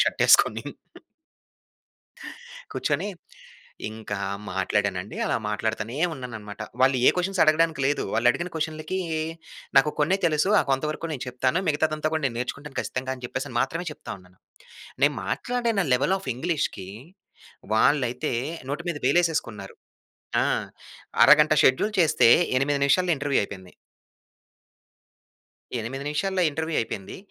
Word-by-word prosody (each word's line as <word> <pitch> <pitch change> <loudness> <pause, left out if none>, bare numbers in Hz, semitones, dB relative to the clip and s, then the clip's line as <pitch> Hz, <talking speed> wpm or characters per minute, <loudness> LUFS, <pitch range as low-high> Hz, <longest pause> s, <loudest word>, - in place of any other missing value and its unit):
Shirt - - -2
ఏసుకొని. - - +5 2.1
కూర్చొని 160 +7 -1 0.8
ఇంకా 110 -2 -6 0.4
మాట్లాడానండి. 95 0 -1
అలా - - +1
మాట్లాడుతూనే 110 +3 -3 0.2
ఉన్నానన్నమాట. 110 -6 -8 0.2
వాళ్ళు 130 0 +4
ఏ - - +9
క్వశ్చన్స్ 185 +1 -1
అడగడానికి 155 -1 +3
లేదు. 145 - 0
వాళ్ళు 120 +2 +3
అడిగిన 175 +7 -3
క్వశ్చన్‌లకి 160 +3 -3 0.8
నాకు 150 +2 +4
కొన్నే 170 +6 +3
తెలుసు 155 +4 +1
ఆ - - +1
కొంత 135 +2 +1
వరకు 165 +2 -5
నేను 135 - -5
చెప్తాను 130 +7 0
మిగతాదంతా 155 0 0
కూడా 160 - -1
నేను 115 -3 -4
నేర్చుకుంటాను 135 +3 -5
ఖచ్చితంగా 130 +1 -3
అని 125 - -13
చెప్పేసి 125 - -5
మాత్రమే 175 +2 -2
చెప్తా - - -9
ఉన్నాను. 90 0 -22 0.7
నేను 145 0 +4
మాట్లాడిన 235 -5 0
లెవెల్ 140 +9 +2
ఆఫ్ 135 - -7
ఇంగ్లీష్‌కి 140 - -2 0.9
వాళ్ళైతే 130 +2 +2 0.4
నోటి 150 +4 -3
మీద 165 - -2
వేలేసేసుకున్నారు. 140 - 0 0.7
ఆ! - - 0 0.8
అరగంట 150 0 +7
షెడ్యూల్ 205 +12 +3
చేస్తే 155 -7 +5 0.3
8 140 +1 +1
నిమిషాల్లో 180 +5 +3
ఇంటర్వ్యూ 140 -1 +1
అయిపోయింది. 95 -2 -9 2.1
8 135 +5 -5
నిమిషాల్లో 185 +5 -1
ఇంటర్వ్యూ 160 +2 -2
అయిపోయింది. 100 -3 -6
145 Hz, 120 wpm, -25 LUFS, 120-160 Hz, 2.1 s, ఏ